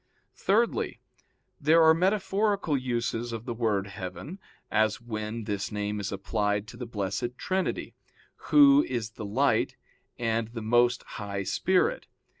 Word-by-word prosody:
Thirdly, 225 Hz, +4 st, +1 dB, 0.6 s
there 160 Hz, +3 st, +5 dB
are 160 Hz, 0 st, +7 dB
metaphorical 195 Hz, 0 st, +1 dB
uses 120 Hz, -2 st, -2 dB
of 115 Hz, 0 st, -6 dB
the 120 Hz, -, -3 dB
word 110 Hz, -4 st, 0 dB
heaven, 95 Hz, -, -7 dB, 0.3 s
as 110 Hz, 0 st, +2 dB
when 110 Hz, -1 st, -5 dB
this 105 Hz, -1 st, -3 dB
name 105 Hz, 0 st, -2 dB
is 100 Hz, -1 st, -3 dB
applied 105 Hz, +1 st, -1 dB
to -, -, -10 dB
the 125 Hz, -1 st, -6 dB
Blessed 105 Hz, +3 st, -3 dB
Trinity, 190 Hz, -1 st, -2 dB, 0.6 s
Who 285 Hz, 0 st, +7 dB
is 115 Hz, -3 st, -3 dB
the 110 Hz, -1 st, -7 dB
Light 130 Hz, +8 st, +1 dB, 0.4 s
and 115 Hz, -1 st, 0 dB
the 115 Hz, -1 st, -7 dB
Most 120 Hz, +2 st, +3 dB
High 100 Hz, -2 st, -5 dB
Spirit. 185 Hz, -, +1 dB
115 Hz, 135 wpm, -28 LUFS, 105-155 Hz, 0.6 s, are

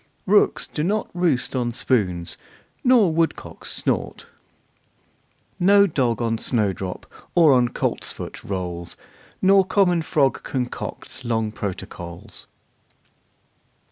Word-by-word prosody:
Rooks 205 Hz, +2 st, +3 dB
do 150 Hz, -, -4 dB
not 210 Hz, +5 st, -1 dB
roost 165 Hz, -8 st, 0 dB
on 120 Hz, -2 st, -1 dB
spoons, 95 Hz, -9 st, 0 dB, 0.5 s
nor 235 Hz, -9 st, +5 dB
woodcocks 165 Hz, 0 st, -2 dB
snort -, -, -2 dB, 1.3 s
Nor 200 Hz, +2 st, +6 dB
dog 125 Hz, -, 0 dB
on 115 Hz, -1 st, 0 dB
snowdrop 100 Hz, -6 st, -1 dB, 0.3 s
or 165 Hz, -5 st, +6 dB
on 125 Hz, -2 st, +3 dB
coltsfoot -, -, -4 dB
rolls. 90 Hz, -3 st, -5 dB, 0.5 s
Nor 195 Hz, +1 st, +6 dB
common 180 Hz, -3 st, +2 dB
frog 140 Hz, -5 st, +1 dB
concocts 125 Hz, 0 st, -5 dB
long 115 Hz, -2 st, -1 dB
protocols. 95 Hz, -1 st, -7 dB
125 Hz, 100 wpm, -23 LUFS, 105-175 Hz, 1.3 s, Nor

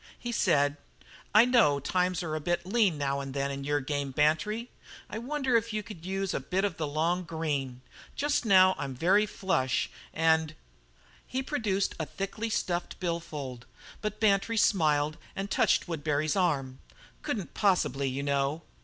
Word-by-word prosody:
He 240 Hz, -, -5 dB
said: 145 Hz, -9 st, +2 dB, 0.5 s
"I 215 Hz, +3 st, +7 dB
know 230 Hz, -, +4 dB
times 180 Hz, +5 st, 0 dB
are 160 Hz, -2 st, -3 dB
a 155 Hz, -, -1 dB
bit 175 Hz, +3 st, -1 dB
lean 195 Hz, -5 st, +2 dB
now 140 Hz, -1 st, -1 dB
and 135 Hz, -1 st, -6 dB
then 140 Hz, 0 st, -1 dB
in 140 Hz, 0 st, -5 dB
your 145 Hz, +1 st, +1 dB
game, 140 Hz, 0 st, -2 dB
Bantry. 160 Hz, -, +1 dB, 0.4 s
I 215 Hz, -, -5 dB
wonder 265 Hz, 0 st, -1 dB
if 230 Hz, -1 st, +1 dB
you 215 Hz, 0 st, -2 dB
could 180 Hz, -5 st, -10 dB
use 195 Hz, 0 st, -2 dB
a -, -, 0 dB
bit 190 Hz, +2 st, -1 dB
of 195 Hz, -5 st, -3 dB
the 155 Hz, -2 st, -2 dB
long 165 Hz, +5 st, 0 dB
green? 145 Hz, -7 st, -3 dB, 0.3 s
Just 290 Hz, -1 st, +1 dB
now 190 Hz, -4 st, +6 dB
I'm 135 Hz, -2 st, -4 dB
very 195 Hz, +9 st, +3 dB
flush, 185 Hz, -11 st, 0 dB, 0.2 s
and 160 Hz, -1 st, +2 dB, 0.4 s
" -, -, -30 dB
He 260 Hz, +1 st, -2 dB
produced 210 Hz, -9 st, -1 dB
a 160 Hz, -, -2 dB
thickly 205 Hz, +4 st, -4 dB
stuffed 175 Hz, -4 st, -2 dB
bill 170 Hz, -2 st, -1 dB
fold, 130 Hz, -7 st, -7 dB, 0.3 s
but 210 Hz, 0 st, -3 dB
Bantry 215 Hz, +1 st, +2 dB
smiled 155 Hz, -7 st, +2 dB, 0.2 s
and 195 Hz, +1 st, -4 dB
touched -, -, +2 dB
Woodbury's 155 Hz, -2 st, -1 dB
arm. 140 Hz, -9 st, 0 dB, 0.4 s
"Couldn't 200 Hz, -7 st, -4 dB
possibly, 140 Hz, -9 st, +1 dB
you 135 Hz, +2 st, -3 dB
know." 140 Hz, +2 st, 0 dB
170 Hz, 170 wpm, -29 LUFS, 145-205 Hz, 0.5 s, I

